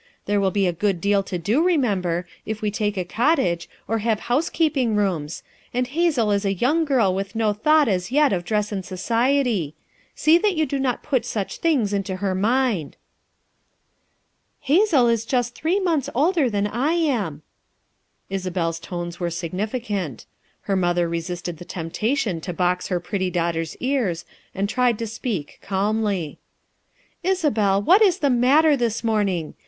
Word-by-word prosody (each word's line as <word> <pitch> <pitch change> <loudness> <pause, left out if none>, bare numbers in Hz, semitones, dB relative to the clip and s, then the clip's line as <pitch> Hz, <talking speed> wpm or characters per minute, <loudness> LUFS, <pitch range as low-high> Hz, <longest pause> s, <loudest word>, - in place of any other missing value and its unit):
There 205 0 +1
will 195 - +2
be 200 0 +1
a 175 - +1
good 190 +1 0
deal 200 +2 +2
to 190 -2 -4
do, 215 - +1
remember, 195 - +1 0.2
if 215 0 -4
we 210 - 0
take 210 -1 -1
a 180 - -1
cottage, 185 - +1 0.2
or 225 0 0
have 220 -1 0
housekeeping 270 -3 +1
rooms, 175 -7 -1 0.3
and 250 0 +1
Hazel 275 -6 +1
is 200 0 +1
a 195 -1 0
youmr 295 - +2
girl 245 -10 +2
with 195 +3 -4
no 220 -2 +1
thought 300 +7 +3
as 185 0 -1
yet 295 -3 +4
of 175 -2 -1
dress 210 +2 -1
and 195 -2 -3
society; 230 - 0 0.4
see 320 +2 +4
that 410 -1 +1
you 315 -1 +2
do 275 0 -2
not 255 -3 -1
put 265 -5 0
such 205 -3 -4
things 265 -12 +1
in 200 - +1
to 190 - -3
her 190 0 -1
mind." 215 - 0 1.6
"Hazel 305 - +4
is 230 -1 +1
just 245 0 -1
three 340 +9 0
months 320 -8 0
older 305 0 +2
than 205 -2 0
I 245 +10 0
am," 230 - -1 0.8
Isabel's 180 -3 -2
tones 175 -1 -6
were 175 -1 -1
significant. 190 - -4 0.4
Her 195 - -1
mother 175 -2 +1
resisted 170 0 -4
the 175 - -9
temptation 180 - -2
to 180 +1 -5
box 180 +1 0
her 180 -2 -1
pretty 185 +1 -2
daughter's 170 -2 -2
ears 240 -11 -1 0.3
and 195 +1 0
tried 245 +1 +1
to 230 - -3
speak 220 - -4
calmly. 200 -4 -1 0.8
"Isabel, 290 - +2
what 365 - +5
is 385 -5 +5
the 285 -2 +1
matter, 285 +6 +4
this 230 -3 -1
morning! 200 -8 0
210 Hz, 165 wpm, -23 LUFS, 180-260 Hz, 1.6 s, what